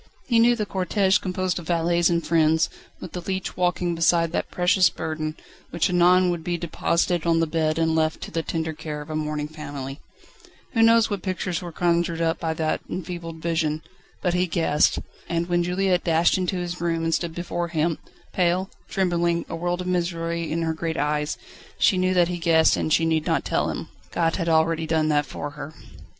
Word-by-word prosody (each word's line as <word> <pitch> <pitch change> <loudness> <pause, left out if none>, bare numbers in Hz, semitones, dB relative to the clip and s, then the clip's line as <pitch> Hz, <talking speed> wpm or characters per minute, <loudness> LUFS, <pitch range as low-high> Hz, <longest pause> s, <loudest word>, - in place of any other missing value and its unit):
He 235 -3 +3
knew 240 +1 +5
the 215 -3 -2
cortège 195 +1 +1
composed 185 -1 -1
of 170 - -10
valets 170 0 +2
and 170 -1 0
friends, 160 0 +3 0.3
with 175 - -8
the 180 - -5
leech 190 +1 -3
walking 180 -1 0
beside 165 0 +2
that - - -2
precious 180 0 +3
burden, 155 -1 -4 0.3
which 170 +1 0
anon 180 +1 +5
would 170 -2 -4
be 175 0 -1
deposited 170 0 0
on 165 -1 +3
the 165 - +3
bed 155 -1 0
and 165 0 +2
left 160 0 +1
to - - -7
the 165 - -1
tender 160 0 -3
care 150 -1 -6
of 150 - -10
a - - -3
mourning 150 -1 -2
family. 145 -3 -7 0.7
Who 225 - +2
knows 225 -1 +5
what 200 -3 -2
pictures 185 -2 -2
were 175 -1 -6
conjured 170 0 +1
up 165 -1 0
before 160 -1 -2
that 160 -1 -1
enfeebled 165 -2 -6
vision? 160 -2 0 0.4
But 180 -2 +1
he 180 +1 +1
guessed. 160 -3 +2 0.3
And 170 0 -1
when 175 -1 +2
Juliette 180 +1 +1
dashed 165 0 +3
into 185 0 -1
his 175 -1 -4
room 165 -1 0
and 165 0 0
stood 165 -1 -1
before 175 0 -3
him, 165 -1 0 0.3
pale, 180 +1 +1 0.2
trembling, 170 -2 0
a 165 - -3
world 175 +2 -2
of - - -5
misery 170 -2 -1
in 165 +1 -1
her 160 -1 0
great 160 0 -3
eyes, 150 +1 -1 0.4
she 185 - +3
knew 185 0 +1
that 175 -1 +4
he 175 0 -3
guessed 160 -1 +4
and - - -1
that - - +2
she 165 - +1
need 160 -1 0
not - - +1
tell - - 0
him. - - -5 0.2
God 165 -1 +1
had 170 -3 -1
already 160 0 +2
done 155 -1 +1
that 145 -1 +2
for 145 +2 -5
her. 150 +2 -9
170 Hz, 205 wpm, -24 LUFS, 160-180 Hz, 0.7 s, knew